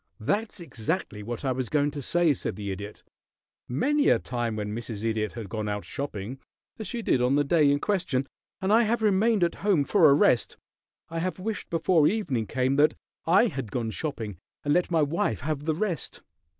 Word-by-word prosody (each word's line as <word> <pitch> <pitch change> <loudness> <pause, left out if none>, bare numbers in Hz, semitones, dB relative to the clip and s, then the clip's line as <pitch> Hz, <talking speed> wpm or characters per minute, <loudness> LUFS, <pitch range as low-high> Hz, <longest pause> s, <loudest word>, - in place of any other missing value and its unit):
"That's 205 - -1
exactly 155 - -3
what 115 +5 -5
I 130 - +2
was 130 -2 -2
going 145 -1 +2
to 145 0 -6
say," 170 +3 +3
said - - -4
the 100 -1 -4
Idiot. 100 +2 -7 0.6
"Many 285 - +2
a - - +5
time 120 -3 -3
when 105 -1 -3
Mrs. 115 -2 -5
Idiot 110 -2 -1
has 115 -2 -6
gone 105 +1 -4
out 105 0 -3
shopping, 130 -3 -5 0.4
as 215 - -5
she 235 +4 -4
did 125 - +2
on 125 +3 +3
the 145 - +3
day 150 0 +4
in 145 - +2
question, 170 -9 0 0.4
and 190 +2 +2
I 230 - +6
have 225 0 +1
remained 210 0 +3
at 170 - +2
home 195 -8 +3
for 165 0 +5
a 140 - +6
rest, 125 -4 +3 0.5
I 165 0 -3
have 185 +2 -2
wished 215 +3 -4
before 165 -2 +3
evening 140 - -1
came 130 +4 0
that 150 +1 +4 0.3
I 190 +8 +6
had 135 - -3
gone 115 -2 -2
shopping 110 - -4 0.3
and 145 - +3
let 180 +2 +2
my 165 -3 +3
wife 145 -6 -1
have 145 +1 -3
the 160 -1 +1
rest. 175 - -3
145 Hz, 200 wpm, -27 LUFS, 115-180 Hz, 0.6 s, I